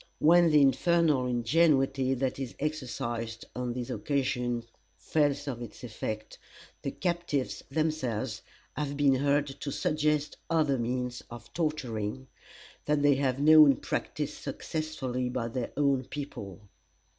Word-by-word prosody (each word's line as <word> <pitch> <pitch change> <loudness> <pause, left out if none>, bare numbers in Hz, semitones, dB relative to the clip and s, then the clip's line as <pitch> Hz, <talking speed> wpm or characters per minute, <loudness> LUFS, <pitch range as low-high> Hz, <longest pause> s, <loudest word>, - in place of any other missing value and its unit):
When 170 +2 +6
the 150 -1 +5
infernal 150 -1 +3
ingenuity 135 +1 +2
that 130 +1 -2
is 130 -3 -5
exercised 120 -6 -3
on 125 0 -2
these 120 -1 -4
occasions 125 -4 -1 0.3
fails 145 -2 0
of 125 -3 -4
its 120 0 -9
effect, 110 -2 -5 0.4
the - - -2
captives 150 - -2
themselves 155 -7 -1 0.3
have 145 -1 -3
been 145 -2 +4
heard 140 +2 +2
to 140 0 -6
suggest 150 +1 0
other 150 -5 +2
means 125 +1 -2
of 120 0 -11
torturing 130 -7 -2 0.6
that 150 -1 +1
they 145 -1 +6
have 135 -1 0
known 150 -1 +8
practised - - -3
successfully 130 -6 -3
by 125 -2 -2
their 120 0 -3
own 140 -3 +2
people. 105 - -7
135 Hz, 125 wpm, -29 LUFS, 125-150 Hz, 0.6 s, known